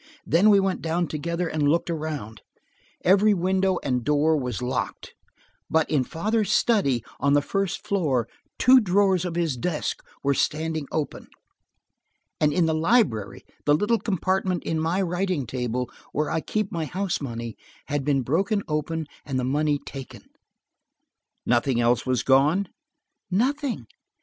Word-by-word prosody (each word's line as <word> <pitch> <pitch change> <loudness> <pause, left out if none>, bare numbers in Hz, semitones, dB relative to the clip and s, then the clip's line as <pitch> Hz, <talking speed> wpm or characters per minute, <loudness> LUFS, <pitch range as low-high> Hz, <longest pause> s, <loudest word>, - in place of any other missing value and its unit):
Then 185 +6 +4
we 200 -1 +6
went 190 -1 0
down 165 +2 0
together 170 +3 -3
and 150 -3 +1
looked 170 +2 +1
around. 150 -9 -5 0.6
Every 200 +3 +5
window 190 +1 +1
and 125 -3 0
door 150 +3 +3
was 125 -7 -2
locked, 125 +1 -3 0.6
but 160 -1 +2
in 145 -4 +3
father's 210 - -1
study, 140 - +2 0.2
on 140 0 +2
the 145 - +4
first 195 +1 -2
floor, 140 - +1 0.3
two 255 +1 +7
drawers 190 -3 +2
of 170 -2 -3
his 165 -5 0
desk 150 +5 -2 0.2
were 140 0 +3
standing 155 +1 -1
open. 155 -2 -3 1.1
And 150 -1 +3
in 170 +3 +2
the 160 - +1
library, 155 - +1 0.2
the 145 - +5
little 215 +7 +1
compartment 185 -2 -1
in 160 - -1
my 170 +5 0
writing 180 -4 -1
table, 125 +1 -2 0.3
where 150 +1 -1
I 160 - 0
keep 215 +2 -2
my 165 -2 -2
house 185 +1 -2
money, 115 -4 -5 0.3
had 145 -2 -2
been 135 -2 +1
broken 195 - 0
open 155 +1 -2 0.2
and 135 -3 -3
the 130 - 0
money 145 +3 +1
taken." 135 -2 -10 1.2
"Nothing 120 +1 +2
else 120 +2 +2
was 130 -1 +1
gone?" 150 +9 +3 0.6
"Nothing. 250 - 0
160 Hz, 150 wpm, -25 LUFS, 140-190 Hz, 1.2 s, two